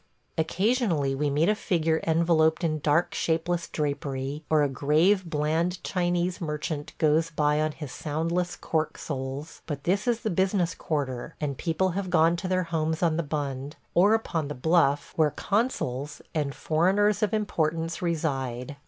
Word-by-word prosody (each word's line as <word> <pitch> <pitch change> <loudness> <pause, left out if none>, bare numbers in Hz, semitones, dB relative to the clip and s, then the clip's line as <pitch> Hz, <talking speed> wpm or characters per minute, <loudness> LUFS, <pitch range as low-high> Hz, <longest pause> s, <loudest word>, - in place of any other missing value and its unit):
Occasionally 175 - +1
we 145 +2 0
meet 150 +4 +2
a 210 - +4
figure 165 -6 0
enveloped 160 0 +3
in 155 -2 0
dark, 150 +4 +2
shapeless 170 +1 0
drapery, 140 -1 -3
or 155 -1 +4
a - - +3
grave, 155 +9 +3
bland 165 +3 0
Chinese 175 0 0
merchant 150 -1 -3
goes 160 +1 +3
by 150 -1 +1
on 155 0 +1
his 150 -4 -7
soundless 165 +4 -2
cork 160 -1 -2
soles, 135 +2 -5
but 145 -3 -4
this 195 +6 0
is 235 -1 +1
the 220 - -1
business 185 -1 +1
quarter, 135 -6 -3
and 145 -2 -2
people 170 +6 0
have 185 +1 -3
gone 165 -1 +4
to 185 - -4
their 185 0 +1
homes 160 -1 -1
on 165 -2 +3
the - - +2
Bund, 145 -2 -4 0.2
or 200 +5 +5
upon 165 -9 -2
the 145 - -5
Bluff, 145 0 +2
where 155 -2 +4
consuls 150 - -1
and 145 -3 -1
foreigners 190 +6 +2
of 210 - +2
importance 165 -6 -1
reside. 140 -6 -2
160 Hz, 160 wpm, -27 LUFS, 150-175 Hz, 0.2 s, or